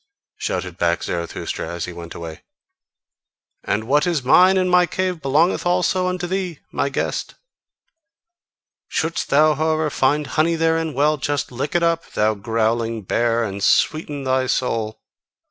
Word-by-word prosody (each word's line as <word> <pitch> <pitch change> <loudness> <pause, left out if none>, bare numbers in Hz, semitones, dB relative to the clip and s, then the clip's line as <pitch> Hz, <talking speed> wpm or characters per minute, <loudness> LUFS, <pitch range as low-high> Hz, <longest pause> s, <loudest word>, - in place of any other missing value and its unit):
shouted 90 -1 -4
back 85 0 +1
Zarathustra, 85 -1 -4
as 85 0 -4
he 90 - -7
went 85 0 -9
away: 80 -2 -8 1.2
"and 105 - -1
what 145 +7 +2
is 165 -6 0
mine 185 +9 +6
in 185 -1 +2
my 180 -1 +4
cave 185 -1 -2
belongeth 150 +6 +2
also 180 +1 +1
unto 180 -1 -2
thee, 180 -2 -3
my - - 0
guest! - - -3 1.5
Shouldst 165 +1 -2
thou 155 +2 +5
however 155 0 0
find 145 +3 +1
honey 155 +5 +1
therein, 165 -2 0
well! 150 +2 +2
just 145 -1 -2
lick 130 +6 -4
it 175 - +3
up, 165 0 0
thou 110 +1 +2
growling 115 +1 -1
bear, 115 +4 +1
and 100 -2 -4
sweeten 145 +1 +1
thy 130 0 +1
soul! 115 -4 -2
145 Hz, 145 wpm, -21 LUFS, 115-165 Hz, 1.5 s, mine